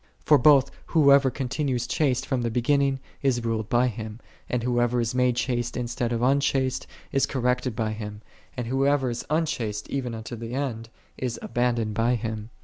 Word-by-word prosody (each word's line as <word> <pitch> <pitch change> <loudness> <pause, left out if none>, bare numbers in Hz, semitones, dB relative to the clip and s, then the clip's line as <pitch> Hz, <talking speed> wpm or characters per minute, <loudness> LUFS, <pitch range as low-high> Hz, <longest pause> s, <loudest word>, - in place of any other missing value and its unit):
For 150 -2 +6
both, 140 0 +5 0.2
whosoever 140 -4 +5
continues 130 -1 -2
chaste 130 -1 0
from 130 -3 -1
the 120 - 0
beginning, 135 +3 +1 0.2
is 125 -4 +1
ruled 110 -2 -1
by 120 +1 +3
Him; 110 -2 -5 0.3
and 125 -2 -1
whoso 120 0 +1
ever 120 0 +2
is 115 +1 -1
made 125 -1 +2
chaste 120 0 -1
instead 120 -1 -2
of 120 0 -1
unchaste, 135 -1 +1 0.2
is 135 - +2
corrected 125 -2 0
by 110 -1 -1
Him; 105 0 -7 0.3
and 125 - -2
whosoever 135 +1 +1
is 120 - -4
unchaste 125 -10 -1
even 125 -4 -2
unto 110 +1 -6
the 115 +2 -6
end, 115 -5 -3 0.3
is 125 -2 -2
abandoned 120 - 0
by 115 +3 +2
Him. 110 -1 -4
125 Hz, 175 wpm, -26 LUFS, 115-135 Hz, 0.3 s, For